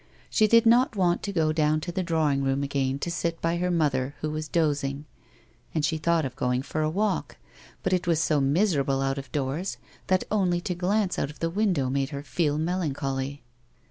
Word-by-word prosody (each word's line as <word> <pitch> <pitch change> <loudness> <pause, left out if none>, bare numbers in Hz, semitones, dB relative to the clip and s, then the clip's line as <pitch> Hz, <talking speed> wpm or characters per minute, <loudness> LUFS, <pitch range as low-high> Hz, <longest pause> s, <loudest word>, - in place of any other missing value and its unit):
She 215 - +4
did 230 +2 +5
not 235 +1 +4
want 175 -3 +2
to 200 - -3
go 160 -4 +1
down 155 -1 +2
to 175 - -4
the 185 - -1
dr:\wing 160 -5 +1
room 135 +1 0
again 135 -1 -1
to 170 +4 -3
sit 170 -1 -2
by 165 +1 0
her 180 +1 0
mother 145 -5 0
who 155 - -2
was 155 0 -4
dozing, 145 -3 0 0.7
and 155 -2 +2
she 160 0 -1
thought 165 0 +2
of 130 -2 -5
going 125 +1 0
for 155 +2 -3
a 155 - +1
walk, 205 +5 -1 0.5
but - - +1
it 180 -1 0
was 165 -3 +3
so 155 -3 +2
miserable 140 -2 +2
out 135 0 -1
of 135 -2 -10
doors 145 +6 -2 0.3
that 185 0 +2
only 185 -4 +2
to 180 - -2
glance 190 +2 0
out 140 - -1
of 150 - -11
the 165 0 -2
window 185 -9 +1
made 135 0 0
her 140 -2 -6
feel 150 +1 0
melancholy. 140 -5 -2
155 Hz, 205 wpm, -26 LUFS, 140-180 Hz, 0.7 s, did